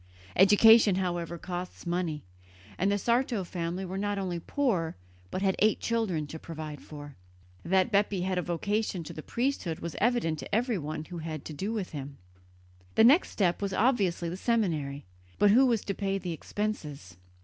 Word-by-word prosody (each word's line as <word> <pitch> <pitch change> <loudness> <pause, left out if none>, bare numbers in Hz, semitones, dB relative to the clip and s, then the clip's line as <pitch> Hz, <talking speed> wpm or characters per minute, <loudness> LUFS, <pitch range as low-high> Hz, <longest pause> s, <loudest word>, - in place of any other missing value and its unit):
Education, 210 +1 +7
however, 175 -2 -2
costs 180 +1 -6
money; 170 -4 -2 0.6
and 195 +2 +2
the 205 - +2
Sarto 235 -1 +1
family 175 +1 -4
were 190 +1 -4
not 205 0 -1
only 180 -3 -2
poor, 185 - -1 0.3
but 185 - -3
had 190 -1 +2
eight 215 0 +3
children 215 -10 -1
to 160 +2 -8
provide 155 -2 -7
for. 145 -2 -10 0.5
That 190 +4 +2
Bepi 200 -2 +2
had 185 0 0
a - - +1
vocation 190 +2 -1
to - - -8
the 155 - -7
priesthood 235 - -2
was 170 -1 -6
evident 215 -9 +1
to 200 - -3
everyone 175 - -1
who 175 0 -7
had 165 +1 -5
had 155 -3 -6
to 155 - -6
do 195 +9 -3
with 210 -5 -3
him. 140 -2 -7 0.8
The - - +6
next 280 +10 +6
step 180 -3 0
was 200 -1 -2
obviously 200 -8 +1
the 175 +2 -4
seminary; 160 - -1 0.3
but 205 -1 +5
who 260 +5 +6
was 230 -4 +1
to 200 - -1
pay 195 0 -1
the 180 -2 -4
expenses? 150 - -5
185 Hz, 180 wpm, -29 LUFS, 165-210 Hz, 0.8 s, Education